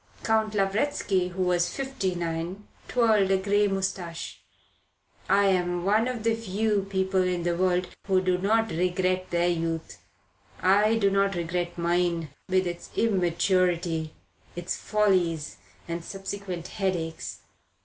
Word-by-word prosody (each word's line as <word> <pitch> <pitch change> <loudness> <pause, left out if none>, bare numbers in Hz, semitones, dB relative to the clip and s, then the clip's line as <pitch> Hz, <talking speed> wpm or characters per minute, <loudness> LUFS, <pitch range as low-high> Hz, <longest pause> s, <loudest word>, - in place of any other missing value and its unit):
Count 220 -1 +1
Lavretsky, 195 -1 +1
who 185 +1 -2
was 175 -1 +1
fifty 265 -9 -2
nine, 170 +4 -4 0.2
twirled 220 -5 +3
a 195 - +4
grey 205 +2 +2
moustache. 190 -3 -3 0.9
"I 200 0 +5
am 175 -1 0
one 215 +4 +3
of 245 -3 -3
the 230 0 +3
few 210 -2 -1
people 190 -1 +1
in 180 -1 0
the 175 0 0
world 180 0 +1 0.2
who 190 -2 +4
do 185 -1 +1
not 225 +4 +2
regret 185 +2 0
their 175 0 +1
youth. 165 - -2 0.6
I 205 +4 +4
do 200 -3 +2
not 195 0 +2
regret 175 +1 -2
mine, 170 -1 0 0.2
with 185 0 +2
its 175 -1 -5
immaturity, 175 -4 +1 0.4
its 175 0 -3
follies 180 -7 +1 0.3
and 170 0 -4
subsequent 195 -2 -6
headaches. 180 -6 -3
185 Hz, 130 wpm, -27 LUFS, 175-200 Hz, 0.9 s, I